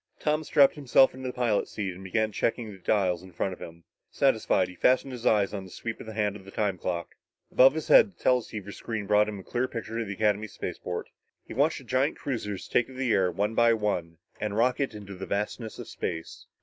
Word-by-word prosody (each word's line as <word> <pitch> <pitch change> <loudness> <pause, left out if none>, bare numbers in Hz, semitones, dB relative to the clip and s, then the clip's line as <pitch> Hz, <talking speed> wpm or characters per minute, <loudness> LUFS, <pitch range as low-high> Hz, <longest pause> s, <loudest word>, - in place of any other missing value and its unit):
Tom 155 +1 0
strapped 145 -2 +5
himself 135 -2 +4
into 130 0 -6
the - - -6
pilot's 120 -4 0
seat 100 -3 -3
and 95 +2 -11
began 110 +3 0
checking 115 +2 -1
the 95 - -12
dials 90 -2 +1
in 95 0 -13
front 95 +3 -2
of - - -11
him. 85 0 -10 0.3
Satisfied, 110 -8 +2
he 90 - -10
fastened 130 +7 +2
his 125 -2 -3
eyes 100 -2 +3
on 100 -2 -4
the 95 - -11
sweep 110 +4 -6
hand 105 -2 -2
of 100 - -10
the 100 - -12
time 100 -3 -1
clock. 85 -1 -3 0.4
Above 135 +3 +6
his 160 - -3
head, 220 - +7
the - - -34
teleceiver 110 -5 0
screen 110 0 -5
brought 105 +1 +3
him 105 - -5
a 95 - -9
clear 125 +5 -1
picture 115 -1 -5
of 115 - -2
the 100 - -3
Academy 105 +1 +1
spaceport. 90 -3 -5 0.4
He - - -8
watched 145 +6 +2
the 135 - -10
giant 130 +4 0
cruisers 105 -8 -4
take 120 - +2
to 130 - -12
the 130 -3 +1
air 95 -2 +3
one 100 +5 -1
by 115 0 +5
one 90 -7 -2 0.2
and 105 -1 -2
rocket 125 +1 +1
into 100 -2 -8
the 95 0 -7
vastness 105 +2 -3
of - - -8
space. 80 -2 -5
105 Hz, 225 wpm, -28 LUFS, 95-125 Hz, 0.4 s, head